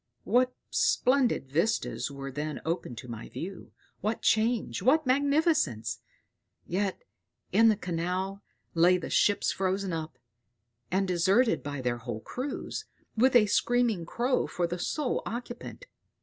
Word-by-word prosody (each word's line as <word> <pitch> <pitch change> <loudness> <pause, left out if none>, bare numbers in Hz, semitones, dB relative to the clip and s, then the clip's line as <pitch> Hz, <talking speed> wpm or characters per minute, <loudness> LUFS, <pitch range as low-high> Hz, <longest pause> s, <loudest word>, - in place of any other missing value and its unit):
What 250 +1 +2 0.2
splendid 250 - +2
vistas 170 +4 0
were 135 -1 -6
then 150 +1 -4
opened 165 -7 -3
to 125 - -8
my 115 -2 -7
view! 190 +2 -7 0.3
What 215 +3 -2
change 225 +1 +1
what 305 +4 +4
magnificence! 280 - +2 0.7
Yonder 190 +2 -1 0.5
in 225 0 +6
the 215 - +4
canal 185 +2 -3 0.3
lay 175 +2 +5
the 175 - -6
ships 205 - +3
frozen 190 -1 -1
up, 155 -4 -5 0.7
and 190 +1 +1
deserted 190 +7 +3
by 145 -1 -5
their 125 -1 -1
whole 120 -2 -5
crews, 265 - -5 0.3
with 250 +3 +4
a 230 -3 +7
screaming 225 -4 +1
crow 250 +6 0
for 175 - -1
the 175 +1 -3
sole 290 - -1
occupant. 240 - -6
195 Hz, 135 wpm, -29 LUFS, 165-245 Hz, 0.7 s, a